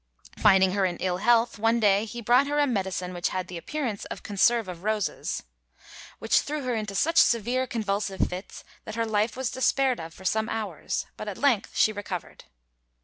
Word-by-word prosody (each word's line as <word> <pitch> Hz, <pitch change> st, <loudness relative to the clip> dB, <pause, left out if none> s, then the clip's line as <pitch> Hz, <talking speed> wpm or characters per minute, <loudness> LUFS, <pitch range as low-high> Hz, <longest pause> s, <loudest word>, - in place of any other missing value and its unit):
Finding 190 Hz, -2 st, +5 dB
her 195 Hz, +1 st, 0 dB
in 180 Hz, -2 st, 0 dB
ill 180 Hz, -1 st, -1 dB
health, 230 Hz, +2 st, +2 dB
one 225 Hz, +2 st, +2 dB
day 205 Hz, -1 st, +3 dB
he 235 Hz, +2 st, -7 dB
brought 250 Hz, +5 st, +4 dB
her 290 Hz, +1 st, -1 dB
"a 295 Hz, -, +4 dB
medicine 190 Hz, -6 st, -2 dB
which 175 Hz, -1 st, -1 dB
had 185 Hz, -1 st, -3 dB
the 180 Hz, -, -8 dB
appearance 240 Hz, -, -4 dB
of -, -, -8 dB
conserve 220 Hz, +2 st, +2 dB
of 175 Hz, -2 st, -7 dB
roses, 210 Hz, -5 st, -2 dB, 0.7 s
which -, -, +3 dB
threw 295 Hz, 0 st, -4 dB
her 250 Hz, -1 st, -1 dB
into 210 Hz, -3 st, -3 dB
such 320 Hz, +10 st, +1 dB
severe 240 Hz, +3 st, +3 dB
convulsive 205 Hz, -4 st, -1 dB
fits 185 Hz, +2 st, -8 dB, 0.2 s
that 215 Hz, -, -6 dB
her 230 Hz, 0 st, 0 dB
life 215 Hz, +1 st, 0 dB
was 260 Hz, -2 st, -2 dB
despaired 260 Hz, -1 st, +1 dB
of 165 Hz, 0 st, -7 dB
for 190 Hz, +3 st, -14 dB
some 220 Hz, +3 st, +1 dB
hours; 210 Hz, -8 st, -3 dB
but 215 Hz, -, -7 dB
at 205 Hz, -, -5 dB
length 260 Hz, -8 st, +1 dB
she 215 Hz, -, +4 dB
recovered." 205 Hz, -3 st, -7 dB
215 Hz, 195 wpm, -26 LUFS, 190-240 Hz, 0.7 s, Finding